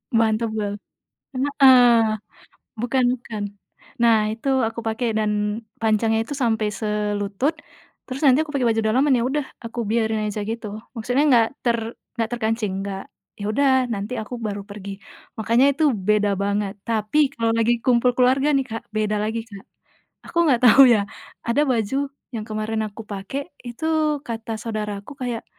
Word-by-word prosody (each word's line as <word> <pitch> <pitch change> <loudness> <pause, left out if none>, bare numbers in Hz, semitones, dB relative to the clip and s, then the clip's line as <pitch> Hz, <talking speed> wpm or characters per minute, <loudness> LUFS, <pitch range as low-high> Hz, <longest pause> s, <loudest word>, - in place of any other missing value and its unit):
Mantap 225 0 +2
banget, 205 -1 -3 0.8
heeh, 245 -3 +8 0.7
bukan 245 +3 0
bukan. 220 -4 -6 0.6
Nah, 230 -1 +6 0.2
itu 225 +5 -3 0.2
aku 230 - -5
pakai 230 +2 -1
dan 215 -1 +1 0.5
panjangnya 220 0 +2
itu 290 - -4
sampai 220 -2 +1
selutut, 210 +5 -1 0.5
terus 260 +1 -6
nanti 275 +3 +5
aku 300 - -9
pakai 260 -4 +1
baju 225 0 +2
dalaman, 260 +5 +3
ya 235 - +1
udah, 275 +2 -1 0.2
aku 230 +1 -6
biarin 220 -1 0
aja 210 0 -3
gitu, 225 0 -4 0.3
maksudnya 250 +5 +1
nggak 230 -2 +5 0.2
ter 235 -1 +2 0.4
nggak 225 - 0
terkancing, 220 -3 -1
nggak 195 -1 -5 0.4
ya 205 - -4
udah, 275 +3 +3 0.2
nanti 205 +4 -4
aku 215 +3 -7
baru 205 -1 -3
pergi. 200 -1 -8 0.5
Makanya 230 +4 +3
itu 310 +3 -1 0.2
beda 210 -1 +3
banget, 200 0 -1
tapi 230 +6 +2
kalau 230 -3 0
lagi 230 +1 +3
kumpul 250 0 +4
keluarga, 260 +3 +3
nih, 270 -2 +2
Kak, 225 - -6
beda 215 0 0
lagi, 220 +2 -2
Kak, 200 -3 -11 0.6
aku 340 - -6
nggak 240 - +2
tahu 275 +4 +8
ya, 205 - +2 0.4
ada 235 +5 +2
baju 230 +2 0 0.4
yang 215 - -3
kemarin 215 +1 -2
aku 210 +2 -10
pakai 205 +7 -4 0.3
itu, 240 +7 -6 0.4
kata 225 -1 -5
saudaraku 210 +1 -5
kayak, 240 -2 -3
225 Hz, 155 wpm, -22 LUFS, 210-250 Hz, 0.8 s, heeh